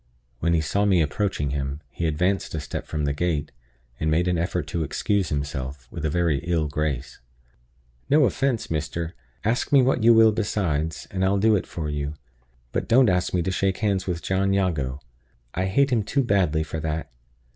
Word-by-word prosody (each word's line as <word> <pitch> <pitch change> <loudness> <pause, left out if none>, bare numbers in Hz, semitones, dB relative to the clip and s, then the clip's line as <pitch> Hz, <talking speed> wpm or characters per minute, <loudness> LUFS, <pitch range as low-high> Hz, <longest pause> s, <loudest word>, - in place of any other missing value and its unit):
When 85 +3 +2
he 80 - +2
saw 100 +7 0
me 95 -3 +4
approaching 75 -2 0
him, 70 0 -3
he 85 - -2
advanced 90 +4 0
a - - -1
step 70 - -5
from 75 -1 -2
the 70 - 0
gate, 75 -1 -1 0.5
and 80 - 0
made 85 +3 +2
an 90 -2 +1
effort 85 -1 -1
to 80 0 -1
excuse 100 +5 0
himself, 70 -3 -4
with 85 - -6
a 80 - +1
very 85 -3 +1
ill 85 -2 0
grace. 75 -3 -3 0.9
"No 150 0 +5
offense, 120 -5 0
mister. 80 +2 -2 0.3
Ask 115 +3 0
me 140 -2 +6
what 125 -1 +2
you 115 +1 +6
will 110 -1 +7
besides, 85 -7 -1
and 95 -1 -1
I'll 95 +1 +3
do 110 +2 +4
it 95 - -1
for 80 -3 -4
you. 75 0 -3 0.6
But - - -2
don't 125 -1 +5
ask 90 -1 +1
me 90 -2 +1
to 95 - -1
shake 95 0 0
hands 100 -4 0
with 85 -2 -2
John 95 +1 +1
Jago; 75 -9 0 0.5
I 95 - -1
hate 135 +8 +2
him 120 -3 +3
too 135 +7 0
badly 90 -8 +2
for 80 0 -5
that. 80 -2 -3
85 Hz, 195 wpm, -24 LUFS, 75-100 Hz, 0.9 s, will